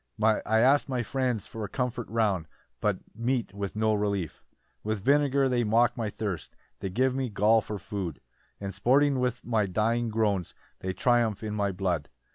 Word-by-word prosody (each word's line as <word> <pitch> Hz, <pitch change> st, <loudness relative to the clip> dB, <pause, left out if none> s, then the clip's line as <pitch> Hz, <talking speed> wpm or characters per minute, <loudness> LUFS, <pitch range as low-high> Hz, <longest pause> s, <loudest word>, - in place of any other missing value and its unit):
"I 110 Hz, 0 st, +3 dB, 0.2 s
ask 135 Hz, +4 st, +4 dB
my 125 Hz, -2 st, 0 dB
friends 125 Hz, -4 st, -1 dB
for 110 Hz, -2 st, -6 dB
comfort 125 Hz, +1 st, -3 dB
round, 105 Hz, -7 st, +1 dB, 0.3 s
"But -, -, 0 dB
meet 115 Hz, -1 st, -1 dB
with 100 Hz, 0 st, -4 dB
no 110 Hz, 0 st, +2 dB
relief. 100 Hz, -5 st, -2 dB, 0.4 s
8 -, -, -51 dB
"With 110 Hz, -2 st, -2 dB
vinegar 140 Hz, 0 st, +3 dB
they 125 Hz, -2 st, +1 dB
mock 115 Hz, +2 st, +3 dB
my 115 Hz, -3 st, -2 dB
thirst; 100 Hz, -7 st, -4 dB, 0.2 s
"They 95 Hz, -, -3 dB
give 130 Hz, +7 st, +1 dB
me 130 Hz, -1 st, -1 dB
gall 110 Hz, +2 st, +4 dB
for 105 Hz, 0 st, -5 dB
food; 95 Hz, -6 st, -5 dB, 0.4 s
"And 100 Hz, -1 st, -5 dB
sporting 135 Hz, +8 st, +3 dB
with 125 Hz, -1 st, -1 dB
my 110 Hz, -4 st, +1 dB
dying 115 Hz, +5 st, +1 dB
groans, 105 Hz, -5 st, 0 dB, 0.2 s
"They 95 Hz, 0 st, -3 dB
triumph 115 Hz, -2 st, +2 dB
in 105 Hz, -1 st, -3 dB
my 100 Hz, -2 st, 0 dB
blood. 90 Hz, -5 st, -1 dB
110 Hz, 175 wpm, -28 LUFS, 100-125 Hz, 0.4 s, ask